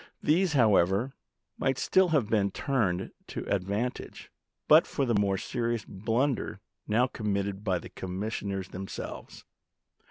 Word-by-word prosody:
These, 170 +2 +3
however, 110 -1 +3 0.5
might 135 -1 +1
still 190 +6 +3
have 150 -10 +2
been 105 -3 +2
turned 100 -7 -1 0.2
to - - -6
ad 100 -2 +1
vantage, 105 +6 -4 0.4
but - - +7
for 140 - -1
the 120 - +1
more 100 -2 +2
serious 120 0 -2
blunder 115 +2 -1 0.3
now 115 +4 +3
committed 100 -4 -2
by 95 -4 +1
the - - -9
commissioners 95 0 -4
themselves. 95 +1 -7
105 Hz, 130 wpm, -29 LUFS, 95-125 Hz, 0.5 s, but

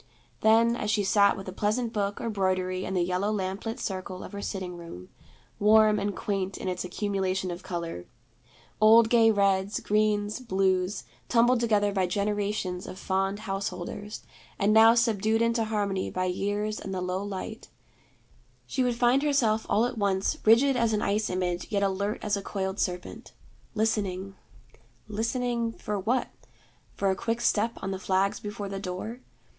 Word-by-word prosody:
Then, 230 +2 +4
as 210 - -3
she 205 -1 +2
sat 200 +1 +4
with 195 - -8
a - - -4
pleasant 225 +4 -1
book 205 -1 -1
or 230 - -3
broidery 185 -2 -1
in 190 - -3
the 180 - +2
yellow 185 +4 0
lamplit 200 +2 -3
circle 185 -1 -5
of - - -9
her 200 -1 -6
sitting 185 -3 -4
room, 165 - -10 0.5
warm 215 0 +5
and 200 0 -2
quaint 195 -2 -2
in - - -6
its 180 -1 -2
accumulation 190 -1 -2
of 175 +1 -6
color, 170 - -5 0.7
old 225 +1 +7
gay 230 -2 +6
reds, 200 -1 +2
greens, 210 0 +1
blues, 190 -4 0 0.3
tumbled 240 +1 +4
together 210 -3 +2
by 190 -2 +1
generations 200 -1 -2
of - - -8
fond 195 +2 -1
house 195 -2 -2
holders, 205 +3 -6 0.3
and 205 +1 +2
now 225 +1 +7
subdued 225 -2 +2
into 230 0 +1
harmony 205 -3 -1
by 185 0 -2
years 205 +3 -2
and 190 -1 -5
the - - -2
low 180 +1 -2
light, 200 -2 -6 1.0
she 265 - -2
would 245 -1 +1
find 245 +3 +3
herself 245 -7 +1
all 220 +3 +3
at 245 -2 -4
once 195 -1 +1
rigid 250 +5 +5
as 230 -2 +1
an 210 - 0
ice 210 +2 0
image, 180 -1 -2
yet 200 -1 +1
alert 200 +2 -1
as 210 -1 +1
a 200 - -3
coiled 190 -1 -3
serpent; 180 -1 -4 0.4
listening, 195 -3 -1 0.7
listening, 230 +2 -1
for 210 -2 -4
what? 235 +7 0 0.7
For 195 -1 +1
a - - 0
quick 230 +4 -2
step 230 -1 +1
on 195 - -2
the 190 - -4
flags 190 +1 +1
before 205 -1 -6
the 195 0 -5
door? 195 +5 -5
205 Hz, 170 wpm, -27 LUFS, 190-220 Hz, 1.0 s, old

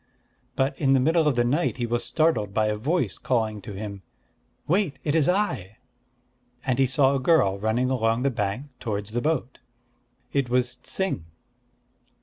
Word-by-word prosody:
But 135 +1 +1
in 135 -3 +3
the 135 - +4
middle 160 +4 +3
of 145 - +2
the 120 - +3
night 145 +6 0
he 120 - -1
was 120 +1 -1
startled 155 -12 +1
by 110 - +3
a 105 0 0
voice 125 - -1
calling 110 -4 -1
to 105 - -8
him, 100 0 -6 0.7
"Wait! 175 -5 +1
it 145 - 0
is 160 -2 +3
I!" 130 - -1 0.9
and 130 -1 0
he 135 - +4
saw 135 +2 +3
a 135 - +1
girl 125 - +3
running 115 +5 0
along 115 -1 +1
the 140 - +2
bank 120 +5 -3
towards 105 -2 -4
the 120 +2 -1
boat. 140 -4 -1 0.7
It 140 -3 +1
was 125 0 +1
Ts'ing. 185 - -2
125 Hz, 170 wpm, -25 LUFS, 110-145 Hz, 0.9 s, the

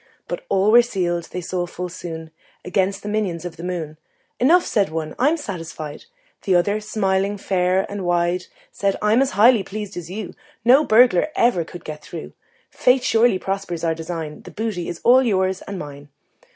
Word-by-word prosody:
But - - -5
all 195 +2 +3
were 240 +2 +8
sealed, 175 -7 -2
they 180 - -6
saw 175 0 -3
full 180 +1 -5
soon, 165 -2 -7 0.3
Against 195 +2 0
the - - -6
minions 195 -6 -2
of 175 - -6
the 165 - -10
moon. 165 -4 -4 0.4
"Enough," 335 +8 +5
said 200 -5 +1
one: 160 -1 -4
"I'm 295 +6 +3
satisfied." 165 - -7 0.4
The 190 -3 +1
other, 200 +4 +2
smiling 200 -1 0
fair 185 -1 +1
and 200 -1 -5
wide, 175 +1 +1 0.3
Said: 195 -1 -1
"I'm 215 +4 +3
as 270 - +1
highly 230 +1 +6
pleased 205 +1 -6
as 170 -1 -6
you: 200 +1 -6 0.3
No 260 +5 +7
burglar 235 -4 +5
ever 235 -8 +3
can 175 +2 -10
get 150 0 -8
through. 165 - -8 0.4
Fate 250 0 +3
surely 230 -4 +3
prospers 190 -3 -4
our 165 -1 +2
design 160 -2 -6
The - - -11
booty 210 -6 -3
all 250 +2 +7
is 260 - +1
yours 190 -2 +1
and 200 - -5
mine." 145 -3 -9
190 Hz, 180 wpm, -21 LUFS, 175-215 Hz, 0.4 s, were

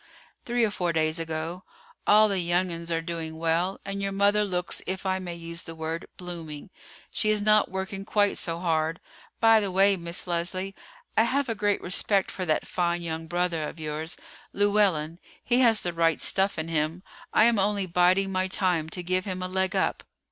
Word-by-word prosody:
"Three 240 0 +1
or 210 - -1
four 180 -4 -1
days 160 0 +1
ago. 165 +2 -4 0.4
All 215 +1 +7
the 200 -2 0
young 175 +1 0
'uns 170 0 -6
are 165 0 0
doing 165 -2 -5
well, 165 +4 0
and 200 0 -4
your 195 0 -1
mother 200 +2 +3
looks, 180 -3 -2
if 190 +1 -4
I 190 0 0
may 175 -2 -6
use 170 0 -4
the 165 - -8
word, 160 +2 -4
blooming. 170 -2 -7 0.4
She 215 - 0
is 215 0 +3
not 215 +1 +4
working 190 +1 -4
quite 205 0 +1
so 165 -1 -2
hard. 165 -1 0 0.4
By 225 -1 +6
the 200 -2 -1
way, 195 +2 +5
Miss 170 0 -2
Leslie, 185 +2 -2 0.4
I 225 - +5
have 270 +2 0
a - - +1
great 205 -1 0
respect 195 +2 +2
for 185 -2 -4
that 155 - +1
fine 175 -1 -1
young 160 -1 -4
brother 175 -1 0
of - - -12
yours, 155 +2 -4 0.4
Llewellyn; 195 -6 +2 0.2
he 245 0 +2
has 230 -4 +5
the 175 - -3
right 165 -1 +2
stuff 195 0 +2
in 160 0 -3
him. 160 +2 -1 0.3
I - - +5
am 235 -3 +3
only 200 0 +1
biding 185 +2 +3
my 185 0 0
time 180 -4 +1
to 180 +2 -5
give 185 +1 0
him 185 -2 -4
a - - -2
leg 190 0 -1
up." - - 0
180 Hz, 200 wpm, -26 LUFS, 165-195 Hz, 0.4 s, All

